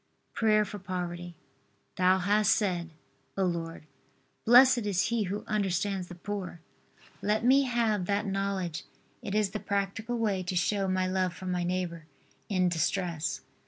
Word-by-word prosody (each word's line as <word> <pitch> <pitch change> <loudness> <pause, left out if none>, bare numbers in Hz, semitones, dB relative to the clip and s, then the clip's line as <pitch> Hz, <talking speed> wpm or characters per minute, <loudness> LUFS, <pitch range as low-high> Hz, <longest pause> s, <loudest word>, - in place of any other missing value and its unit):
PRAYER 215 -1 +3
FOR 205 +1 -7
POVERTY. 175 -2 -5 0.6
Thou 185 +1 +4
hast 205 +3 +3
said, 180 -5 -1 0.5
O 195 - +2
Lord, 165 -3 -3 0.6
"Blessed 245 -1 +7
is 195 0 +1
he 230 -3 0
who 200 +3 -4
understands 195 -2 -1
the 175 - -9
poor." 190 -1 -5 0.6
Let 215 +2 0
me 270 +2 +5
have 230 -6 +1
that 205 +1 0
knowledge. 195 -4 -2 0.4
It 200 - -4
is 210 -2 +2
the 215 - -3
practical 200 +4 -2
way 210 -5 0
to 185 0 -4
show 195 +2 +1
my 185 0 +1
love 185 -1 0
for 185 - -9
my 180 -1 -1
neighbor 175 -3 -3 0.4
in 185 -3 +2
distress. 170 -1 -1
190 Hz, 150 wpm, -29 LUFS, 180-210 Hz, 0.6 s, Blessed